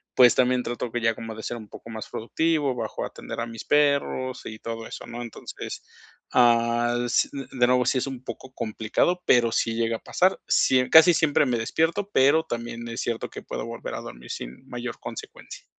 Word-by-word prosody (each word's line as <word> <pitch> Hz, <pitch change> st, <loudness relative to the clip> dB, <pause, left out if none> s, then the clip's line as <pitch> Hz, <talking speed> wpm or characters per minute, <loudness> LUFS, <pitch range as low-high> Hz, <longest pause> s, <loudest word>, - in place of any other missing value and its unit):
pues 125 Hz, -2 st, +7 dB
también 125 Hz, 0 st, +2 dB
trato 120 Hz, -1 st, -4 dB
que 120 Hz, -, -1 dB
ya 115 Hz, 0 st, +3 dB
como 115 Hz, 0 st, -7 dB
de 110 Hz, -, -8 dB
ser 120 Hz, -, -4 dB
un 110 Hz, -2 st, -10 dB
poco 115 Hz, -, -12 dB
más 110 Hz, -1 st, -6 dB
productivo, 150 Hz, +3 st, 0 dB
bajo 125 Hz, -, -4 dB
a -, -, -2 dB
atender -, -, -7 dB
a -, -, -1 dB
mis 115 Hz, -1 st, -8 dB
perros 140 Hz, -3 st, +1 dB
y 110 Hz, -1 st, -7 dB
todo 115 Hz, 0 st, -6 dB
eso, -, -, -8 dB
¿no? 120 Hz, +1 st, -6 dB
Entonces 120 Hz, -2 st, -7 dB, 0.5 s
ah 120 Hz, 0 st, +4 dB
s 120 Hz, -, +2 dB
de 130 Hz, -3 st, 0 dB
nuevo, 125 Hz, 0 st, +3 dB
sí 130 Hz, +2 st, +2 dB
es 125 Hz, -, -2 dB
un 130 Hz, -2 st, -6 dB
poco 130 Hz, 0 st, -8 dB
complicado, 115 Hz, +10 st, 0 dB
pero 120 Hz, -2 st, +4 dB
sí 115 Hz, 0 st, 0 dB
llega 115 Hz, 0 st, 0 dB
a -, -, -21 dB
pasar. 185 Hz, +1 st, +1 dB
Sí 130 Hz, -, +4 dB
e 125 Hz, -, 0 dB
casi 160 Hz, +2 st, +8 dB
siempre 155 Hz, -2 st, +3 dB
me 125 Hz, -3 st, +1 dB
despierto, 165 Hz, -, 0 dB
pero 140 Hz, +5 st, +5 dB
también 120 Hz, -3 st, -5 dB
es 115 Hz, 0 st, -4 dB
cierto 115 Hz, -1 st, -3 dB
que -, -, -8 dB
puedo -, -, -5 dB
volver -, -, -6 dB
a -, -, -4 dB
dormir, -, -, -9 dB
sin 65 Hz, -, -7 dB
mayor 120 Hz, -1 st, -5 dB
consecuencia. -, -, -9 dB
120 Hz, 210 wpm, -25 LUFS, 115-135 Hz, 0.5 s, casi